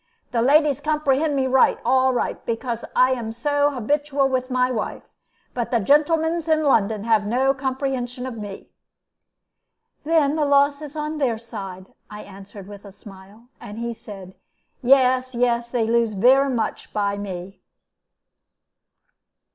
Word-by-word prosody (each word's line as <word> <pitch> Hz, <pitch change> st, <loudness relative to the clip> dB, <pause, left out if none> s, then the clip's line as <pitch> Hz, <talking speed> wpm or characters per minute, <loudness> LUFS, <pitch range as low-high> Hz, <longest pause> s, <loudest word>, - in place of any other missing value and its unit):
"The 235 Hz, -, 0 dB
ladies 290 Hz, +2 st, +3 dB
comprehend 300 Hz, 0 st, 0 dB
me 265 Hz, -1 st, +1 dB
right, 260 Hz, 0 st, +3 dB
all 260 Hz, +1 st, +3 dB
right, 245 Hz, -, -2 dB
because 230 Hz, 0 st, -4 dB
I 255 Hz, +1 st, +4 dB
am 235 Hz, -4 st, -3 dB
so 285 Hz, +5 st, +1 dB
habitual 285 Hz, +2 st, 0 dB
with 255 Hz, 0 st, -2 dB
my 255 Hz, 0 st, +1 dB
wife. 220 Hz, -4 st, -4 dB, 0.5 s
But 240 Hz, -2 st, -3 dB
the 235 Hz, -, +1 dB
gentlemans 320 Hz, -, +2 dB
in 315 Hz, -1 st, +2 dB
London 220 Hz, -7 st, +1 dB
have 220 Hz, -2 st, +1 dB
no 260 Hz, +4 st, +2 dB
comprehension 260 Hz, -2 st, -3 dB
of 255 Hz, -2 st, -6 dB
me." 205 Hz, -3 st, -9 dB, 1.3 s
"Then 305 Hz, -2 st, +2 dB
the 310 Hz, -, 0 dB
loss 285 Hz, +1 st, +3 dB
is 300 Hz, 0 st, -9 dB
on 305 Hz, 0 st, -4 dB
their 245 Hz, -6 st, 0 dB
side," 195 Hz, -5 st, -8 dB, 0.2 s
I 210 Hz, 0 st, -9 dB
answered, 195 Hz, 0 st, -12 dB
with 205 Hz, -1 st, -11 dB
a 200 Hz, -, -12 dB
smile; 200 Hz, +4 st, -16 dB
and 220 Hz, -3 st, -10 dB
he 235 Hz, 0 st, -4 dB
said, 205 Hz, -5 st, -11 dB, 0.5 s
"Yes, 255 Hz, -1 st, +3 dB
yes, 235 Hz, -1 st, 0 dB
they 235 Hz, -2 st, 0 dB
lose 230 Hz, -1 st, +1 dB
vere 260 Hz, +7 st, +4 dB
much 240 Hz, -4 st, -3 dB
by 200 Hz, -1 st, 0 dB
me." 190 Hz, -1 st, -7 dB
250 Hz, 145 wpm, -22 LUFS, 220-280 Hz, 1.3 s, I